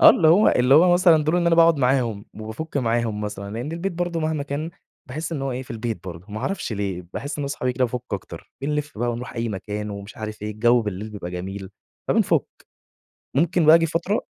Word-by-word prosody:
آه، - - +10
اللي 160 - +4
هو 185 +7 +6
اللي 125 +2 +4
هو 175 +4 +7
مثلًا 175 -4 +5
دول 155 +3 +2
إن 175 -1 +1
أنا 170 - +5
باقعد 165 -1 +6
معاهم 125 -6 +1
وبافٌك 110 +9 -6
معاهم 115 -4 0
مثلًا، 100 -1 -5
لأن 125 +7 -4
البيت 175 +3 -2
برضه 175 -1 -2
مهما 155 -2 -1
كان 145 +3 -4 0.4
باحس 155 +5 -4
إن 145 -4 -3
هو 135 -1 -1
إيه، 125 +1 -4
في 130 - -16
البيت 115 -5 -4
برضه. 85 -1 -8
ما 110 - -4
أعرفش 185 - -2
ليه 100 -3 -3
باحس 145 +2 -5
إن - - -1
أنا 140 - -2
صحابي 125 -2 -1
كده 125 +1 +1
بافك 125 0 -3
أكتر. 100 - -6
بنلف 150 -1 -2
ونروح 120 +2 -2
أي 115 -1 -2
مكان 105 +1 -4
ومش 100 +1 -8
عارف 110 -1 -6
إيه 105 - -3
الجو 120 +3 +3
بالليل 105 +1 -5
بيبقى 100 -4 -6
جميل 95 +2 -6 0.4
فبنفك، 225 -2 +3 0.9
ممكن 170 -1 +3
بقى 155 - +9
اجي 165 0 +5
فترة 170 +6 0
125 Hz, 215 wpm, -23 LUFS, 105-160 Hz, 0.9 s, آه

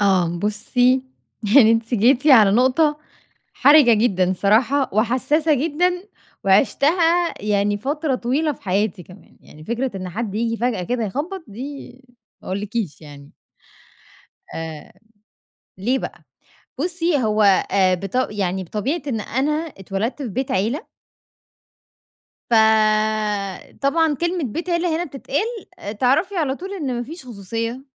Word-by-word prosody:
آه 180 -4 +2
بُصّي 245 +6 +1 0.5
يعني 230 -5 +8
أنتِ 230 +2 0
جيتِ 250 +6 +3
على 225 -9 +7
نُقطة، 275 +6 +3 0.5
حَرِجة 285 -2 +6
جدًا 190 -5 +1
صراحة 240 +8 +2
وحساسة 260 +8 +2
جدًا، 345 +6 0 0.4
وعِشتها 330 - +3
يعني 205 0 +1
فترة 285 +4 -1
طويلة 270 +6 0
في - - -15
حياتي 195 -1 -1
كمان، 180 +2 -17
يعني 155 +1 -15
فكرة 240 +2 -3
إن 185 -1 -5
حد 210 +2 -4
ييجي 230 +1 -1
فجأة 235 -4 -1
كده 235 +4 -2
يخبَّط 320 - -4
دي 275 +7 -8 0.5
ما - - -10
اقولكيش 200 -2 -3
يعني. 145 -2 -13 1.2
آآ 160 -2 -7 0.9
ليه 245 +8 0
بقى - - -8 0.6
بصّي 340 -1 0
هو 215 0 +1 0.3
آآ 190 -2 +3
بط 195 +8 -2
يعني 190 -2 -2
بطبيعة 255 - -3
إن 235 -6 -2
أنا 265 +8 -1 0.3
اتولدت 195 +9 -3
في 250 - -4
بيت 255 +5 -3
عيلة 225 - -1 1.6
فطبعًا 215 - +1
كلمة 345 -1 -1
بيت 330 - -4
عيلة 340 -1 +1
هنا 345 - -2
بتتقال، 360 - -4 0.3
تعرفي 315 +10 +2
على 285 -5 0
طول 380 +5 -8
إن 280 -10 -3
ما 240 - -2
فيش 305 +3 -9
خصوصية. 230 +3 -5
240 Hz, 125 wpm, -21 LUFS, 205-290 Hz, 1.6 s, يعني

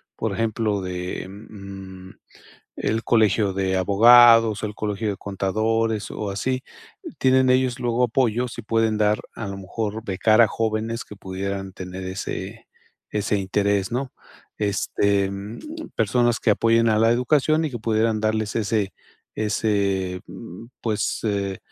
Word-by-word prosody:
por 110 -2 -2
ejemplo, 110 -1 -1
de, 90 0 -5
mm, 95 -2 -10 0.7
el 115 +1 -1
Colegio 110 -3 +3
de 95 0 0
Abogados, 115 +2 +6
el 105 -1 -3
Colegio 105 0 -2
de 100 - -4
Contadores, 110 +2 -1
o 105 -2 -4
así. 130 +6 -2 0.6
Tienen 130 0 +4
ellos, 130 -1 +2
luego 120 0 +1
apoyos, 120 0 0
y 120 - -5
pueden 110 0 +1
dar 105 0 +2 0.2
a 115 - -5
lo 100 0 -6
mejor, 105 +3 -4
becar 110 +2 +3
a 115 - +8
jóvenes, 115 +1 -2
que 105 - -12
pudieran 95 0 -5
tener 95 0 -7
ese-ese 100 +2 -5
interés, 100 +1 0
¿no? 130 +1 -2 0.5
Este, 100 -1 +1
mm, 100 +3 -7 0.4
personas 120 +2 +2
que 115 - +2
apoyen 115 +2 +3
a 110 - +2
la 115 +1 +4
educación, 150 +6 +2
y 155 - -1
que 120 - -5
pudieran 110 0 +1
darles 110 0 -1
ese 105 -2 0 0.4
ese 100 -4 0
mm, 90 +7 -10 0.2
pues, 110 -3 -1
eh, 100 -2 -1
110 Hz, 140 wpm, -23 LUFS, 100-115 Hz, 0.7 s, a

